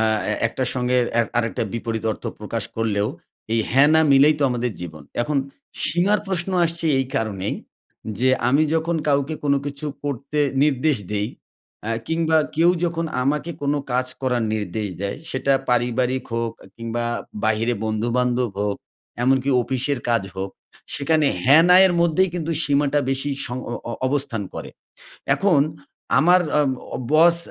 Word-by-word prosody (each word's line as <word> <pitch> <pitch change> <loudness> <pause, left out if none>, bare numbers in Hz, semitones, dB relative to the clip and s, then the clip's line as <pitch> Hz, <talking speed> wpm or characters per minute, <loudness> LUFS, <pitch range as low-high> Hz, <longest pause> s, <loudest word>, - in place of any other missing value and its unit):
আ - - +3 0.3
এ - - +1
একটার 125 +2 -2
সঙ্গে 125 0 +1 0.2
এ - - +7 0.2
আরেকটা 115 -1 -1
বিপরীত 115 -1 -3
অর্থ - - -12 0.2
প্রকাশ - - -3
করলেও, 105 -2 0 0.4
এই 115 - +3
হ্যাঁ, 135 +4 +6
না 160 - +6
মিলেই 145 +3 +6
তো 145 - 0
আমাদের 120 -1 -1
জীবন। 80 -4 -8 0.2
এখন 150 +3 -1 0.5
সীমার 195 +5 +2
প্রশ্ন 190 -1 -2
আসছে 165 0 -2
এই 130 - 0
কারণেই, 105 -3 -2 0.7
যে 130 0 +4 0.2
আমি 140 +5 +4
যখন 165 +1 0
কাউকে 140 +2 +1
কোনো 140 -1 +3
কিছু 145 +1 -5 0.2
করতে 140 +1 -3 0.3
নির্দেশ 150 0 +2 0.2
দেই, 105 +1 -1 0.6
অ্যা 115 - -1 0.2
কিংবা 160 -1 +2 0.2
কেউ 170 +2 +5
যখন 170 -1 -1 0.2
আমাকে 150 +5 0
কোনো 145 +1 +1
কাজ 125 +1 +1
করার 125 -3 0
নির্দেশ 105 0 -3
দেয়, 100 0 -2
সেটা 135 +1 +1 0.2
পারিবারিক 125 +1 +1
হোক 115 -1 -1
এ - - -14
কিংবা 115 0 -3 0.4
বাহিরে 110 +2 +1
বন্ধুবান্ধব 120 +2 0
হোক, 100 -1 -1 0.5
এমনকি 135 +2 +2
অফিসের 130 +2 -1
কাজ 115 -3 +2
হোক, 95 0 -3 0.4
সেখানে 155 +1 +2 0.2
হ্যা-না 165 +6 +7
এর 180 - +1
মধ্যেই 170 +3 +3
কিন্তু 165 -2 -3
সীমাটা 145 0 +2
বেশি 135 +2 -1 0.2
সং 125 0 -4
অ - - -3 0.2
অ - - -3
অবস্থান 130 -5 -1
করে। - - -6 0.7
এখন 185 -7 +3 0.6
আমার 180 +3 +5 0.2
আ - - +5 0.3
ও - - -1 0.2
বস 170 +2 +6
130 Hz, 155 wpm, -22 LUFS, 115-155 Hz, 0.7 s, এ